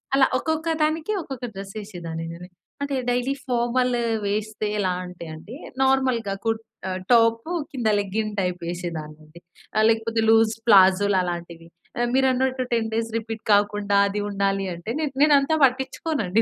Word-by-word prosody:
అలా 270 -1 +5
ఒక్కొక్క 320 0 -2 0.2
దానికి, 315 +6 0
ఒక్కొక్క 265 -4 -6
డ్రెస్ 195 +1 -8
ఏసేదాన్నినేను. 170 -3 -7 0.3
అంటే, 280 -1 -1 0.2
డైలీ 250 +2 0
ఫార్మల్ 250 0 +1 0.3
వేస్తే 215 +1 -2
ఎలా 190 -2 +1
అంటే 180 -1 -9
అండి, 200 +10 -10 0.3
నార్మల్‌గా 260 -6 +2
కుర్ 225 -1 0 0.3
ఆహ్, 185 0 -3
టాపు 230 +5 +3 0.2
కింద 245 -5 -2
లెగ్గింగ్ 210 +1 -2
టైప్ 180 -1 -2
ఏసేదాన్నండి. 155 -2 -7 0.5
లేకపోతే 225 0 0
లూజ్ 225 0 +5 0.2
ప్లాజోలు 195 -1 +6
అలాంటివి. 170 -1 -6 0.5
మీరన్నట్టు 260 0 +2
10 230 -2 +1
డేస్ 225 +1 -1
రిపీట్ 225 -1 -4
కాకుండా, 205 0 +2
అది 200 +1 -3
ఉండాలి 195 -1 0
అంటే, 170 +5 -8
నేన్ 300 -3 -2
నేనంతా 295 +1 +5
పట్టించుకోనండి 260 - +1
220 Hz, 130 wpm, -24 LUFS, 190-255 Hz, 0.5 s, ప్లాజోలు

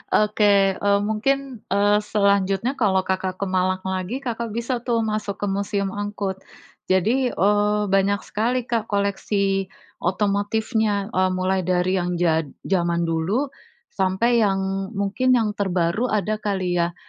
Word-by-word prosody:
Oke, 210 0 +2 0.4
eee, 200 0 +3
mungkin, 255 +4 -1
eee, 205 +1 +3
selanjutnya 200 +1 +1
kalau 190 -5 +2
Kakak 185 0 -2
ke 200 - -3
Malang 185 0 +1
lagi, 190 +8 -3
Kakak 230 -3 -4
bisa 235 +1 -2
tuh 230 -1 +1
masuk 215 -2 -2
ke - - +1
Museum 200 0 -1
Angkut. 205 -1 -4 0.5
Jadi, 225 +8 +2
eee, 210 +1 +2
banyak 195 0 +2
sekali 240 +4 -1
Kak 230 -2 -2
koleksi 200 -1 0 0.3
otomotifnya. 205 +2 0
Eee, 185 0 +2
mulai 185 -1 0
dari 185 +1 +1
yang 175 0 -2
jad 165 -3 +1 0.2
jaman 170 -2 0
dulu, 175 - -1 0.4
sampai 195 +5 +1
yang 195 -3 +2 0.4
mungkin 210 +6 +2
yang 220 -3 +1
terbaru 190 +2 0
ada 215 -1 -1
kali 185 -4 -1
ya, 170 0 0
200 Hz, 135 wpm, -23 LUFS, 185-215 Hz, 0.5 s, eee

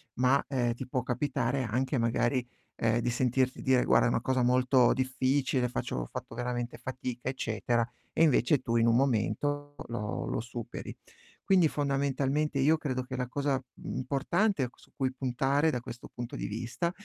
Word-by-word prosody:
ma, 130 +3 +3
ehm, 120 -4 0
ti 125 +2 -7
può 125 -1 -1
capitare 130 +1 0
anche 130 +5 0
magari, 120 +2 +1 0.3
ehm, 115 0 +2
di 120 - 0
sentirti 130 +1 +1
dire: 130 -1 +3
"Guarda - - +4
è - - +3
una 115 - +1
cosa 130 0 +1
molto 125 0 +4
difficile, 130 0 +1
faccio 120 - -3
ho - - -2
fatto - - -7
veramente 120 0 -3
fatica", 130 -1 -5
eccetera, 120 -2 0 0.3
e - - +3
invece 145 -2 +4
tu 115 0 0
in 115 0 +4
un 115 - +4
momento 145 +3 0
lo 105 -3 -3
lo - - -1
superi. 120 0 -6 0.5
Quindi 180 -5 +4
fondamentalmente 140 0 0
io 150 +4 +5
credo 130 -5 -2
che 130 0 -6
la 125 -1 -2
cosa, 140 -1 0
mhmm, - - -6
importante 140 - +1
su - - -21
cui 130 -2 -1
puntare 135 +4 +1
da 125 - -1
questo 120 0 -9
punto 120 0 -6
di - - -4
vista, 120 - -2
130 Hz, 170 wpm, -30 LUFS, 120-140 Hz, 0.5 s, io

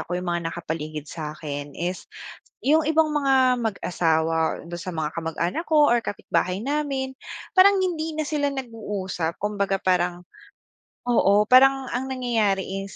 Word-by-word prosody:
ako, 175 - -4
yung 180 0 -3
mga 170 -1 -1
nakapaligid 155 -3 -5
sakin 150 -2 -6
is, 180 +2 -4 0.5
yung 310 +3 +3
ibang 315 +1 +3
mga 265 -3 +3
mag-asawa, 165 -6 0
do'n 175 0 -6
sa 185 - -5
mga 160 -2 -3
kamag 165 -1 -4
anak 180 - -1
ko, 300 -3 +4
or 240 -1 +2
kapitbahay 185 -2 -1
namin, 270 0 -2 0.4
parang 390 +1 +6
hindi 325 -4 -1
na 310 -1 -3
sila 290 -2 0
nag-uusap. 205 -10 -4
Kumbaga 200 -1 -1
parang 180 -1 0 0.8
oo, 210 -4 +4
parang 265 +3 +5
ang 255 +2 -2
nangyayari 230 -7 0 0.2
is 195 - -13
205 Hz, 145 wpm, -24 LUFS, 170-270 Hz, 0.8 s, parang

